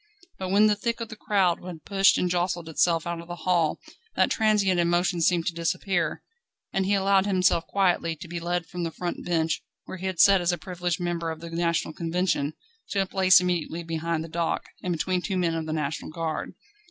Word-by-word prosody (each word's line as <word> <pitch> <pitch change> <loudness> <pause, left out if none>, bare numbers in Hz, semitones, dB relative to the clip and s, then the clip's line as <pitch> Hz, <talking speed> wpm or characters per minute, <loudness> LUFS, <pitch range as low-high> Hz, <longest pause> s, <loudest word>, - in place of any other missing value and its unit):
But 190 -1 -3
when 205 +3 +5
the 210 -1 +4
thick 230 +3 -2
of 230 -1 -5
the 220 - -8
crowd 195 -5 +1
had 175 -3 -9
pushed 195 -1 +4
and 180 - +1
jostled 175 -1 -1
itself 165 0 +1
out 170 -1 -3
of 170 - -13
the 175 - -5
hall, 170 -4 +2 0.4
that - - +3
transient 205 -4 +2
emotion 175 +1 +1
seemed 170 0 +2
to 175 - -1
disappear, 170 +1 -1 0.5
and 190 -1 0
he 200 - +3
allowed 195 0 +3
himself 180 -3 +2
quietly 175 -4 +1
to 175 +3 -10
be 170 0 -5
led 175 0 -2
from 180 +1 -6
the 170 - -1
front 175 +2 -5
bench, 165 -2 0 0.2
where - - -7
he 190 - -3
had 185 -3 -4
sat 195 -2 +7
as 175 0 +2
a 175 - -1
privileged 175 -1 -3
member 170 -1 -2
of 160 -1 -5
the 170 0 -9
National 170 -1 0
Convention, 165 -3 -1 0.4
to 200 - +1
a - - -5
place 190 -1 +5
immediately 175 -2 -2
behind 165 0 -2
the - - -7
dock, 165 +1 -1 0.2
and 180 - -2
between 180 +2 0
two 190 0 -2
men 170 -2 +1
of 160 -1 -3
the - - -3
National 155 -1 -3
Guard. 160 0 -4
175 Hz, 215 wpm, -26 LUFS, 165-190 Hz, 0.5 s, sat